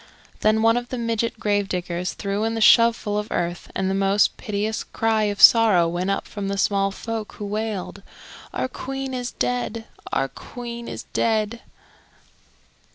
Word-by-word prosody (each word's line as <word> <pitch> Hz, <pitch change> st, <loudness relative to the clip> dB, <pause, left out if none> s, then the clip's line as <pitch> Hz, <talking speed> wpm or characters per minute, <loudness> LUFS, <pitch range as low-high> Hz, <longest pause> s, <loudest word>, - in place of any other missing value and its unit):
Then 215 Hz, +1 st, +2 dB
one 225 Hz, +1 st, +4 dB
of 245 Hz, 0 st, -4 dB
the 255 Hz, -, -4 dB
midget 230 Hz, -1 st, -1 dB
grave 205 Hz, -1 st, 0 dB
diggers 180 Hz, 0 st, -3 dB
threw 200 Hz, +1 st, -2 dB
in 225 Hz, 0 st, -1 dB
a -, -, -1 dB
shovelful 230 Hz, -2 st, +5 dB
of 210 Hz, -, -4 dB
earth 175 Hz, 0 st, -3 dB
and 190 Hz, -, 0 dB
the 190 Hz, -, 0 dB
most 195 Hz, +1 st, +2 dB
piteous 210 Hz, +1 st, -3 dB
cry 220 Hz, -1 st, 0 dB
of 205 Hz, -1 st, -2 dB
sorrow 215 Hz, -7 st, +7 dB
went 175 Hz, +3 st, -2 dB
up 195 Hz, -, -1 dB
from 200 Hz, -2 st, -5 dB
the 200 Hz, 0 st, -2 dB
small 195 Hz, 0 st, +2 dB
folk, 220 Hz, +2 st, -5 dB
who 205 Hz, -, -7 dB
wailed, 210 Hz, -2 st, -4 dB, 0.5 s
"Our -, -, -2 dB
Queen 270 Hz, +1 st, -5 dB
is 250 Hz, -1 st, -3 dB
dead! 245 Hz, -2 st, -2 dB, 0.3 s
Our 135 Hz, -, +1 dB
Queen 235 Hz, -, -8 dB
is -, -, -6 dB
dead!" 220 Hz, 0 st, 0 dB
215 Hz, 165 wpm, -23 LUFS, 195-230 Hz, 0.5 s, sorrow